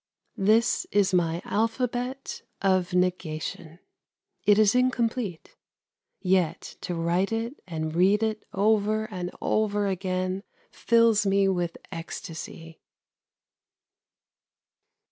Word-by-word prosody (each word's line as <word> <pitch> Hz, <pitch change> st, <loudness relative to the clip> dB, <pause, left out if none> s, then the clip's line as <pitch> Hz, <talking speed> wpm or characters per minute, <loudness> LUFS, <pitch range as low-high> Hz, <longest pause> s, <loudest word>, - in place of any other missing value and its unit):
That 220 Hz, +4 st, +3 dB
is 200 Hz, -2 st, +3 dB
my 170 Hz, -1 st, +1 dB
alphabet 245 Hz, +4 st, -2 dB, 0.2 s
of 185 Hz, -2 st, +2 dB
negation. 170 Hz, -2 st, -2 dB, 0.7 s
It 205 Hz, -1 st, +6 dB
is 215 Hz, -1 st, +5 dB
incomplete. 240 Hz, -7 st, 0 dB, 0.6 s
Yet 180 Hz, -3 st, 0 dB
to 175 Hz, -, -3 dB
write 170 Hz, +4 st, 0 dB
it 230 Hz, +4 st, -3 dB
and 160 Hz, -2 st, -3 dB
read 195 Hz, +5 st, +3 dB
it 220 Hz, -1 st, -1 dB
over 215 Hz, +1 st, +2 dB
and 180 Hz, -2 st, -4 dB
over 210 Hz, -1 st, +1 dB
again 185 Hz, 0 st, -1 dB, 0.3 s
fills 230 Hz, -3 st, +3 dB
me 195 Hz, 0 st, +3 dB
with 175 Hz, -3 st, -1 dB
ecstasy. 165 Hz, 0 st, -8 dB
195 Hz, 95 wpm, -26 LUFS, 175-220 Hz, 0.7 s, It